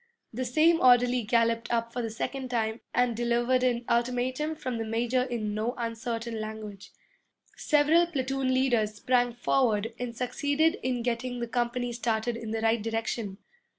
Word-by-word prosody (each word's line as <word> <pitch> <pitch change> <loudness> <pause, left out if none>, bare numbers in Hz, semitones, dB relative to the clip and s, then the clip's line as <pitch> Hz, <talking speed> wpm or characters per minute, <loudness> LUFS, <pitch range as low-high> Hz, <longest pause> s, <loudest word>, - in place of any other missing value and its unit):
The 255 +3 -3
same 315 +7 +4
orderly 245 0 +5
galloped 230 +1 +1
up 230 0 -1
for 245 - -2
the 225 - -3
second 255 +4 -4
time 225 -2 -1
and 245 -1 +1
delivered 240 +2 +1
an 245 -1 +1
ultimatum 250 +6 0
from 255 -6 -4
the - - -1
major 235 +3 0
in 235 -5 -2
no 220 +4 -2
uncertain 230 -1 -3
language. 215 -2 -7 0.6
Several 310 +3 +3
platoon 270 -4 -1
leaders 240 -5 +1
sprang 245 +2 +1
forward 230 -3 +1
and 240 -2 -5
succeeded 290 +7 +1
in 250 -2 -1
getting 245 +1 -2
the 235 - -3
company 240 0 -1
started 230 0 -1
in 230 -1 -6
the 220 0 -2
right 225 0 +2
direction. 225 -2 -3
240 Hz, 155 wpm, -28 LUFS, 225-255 Hz, 0.6 s, orderly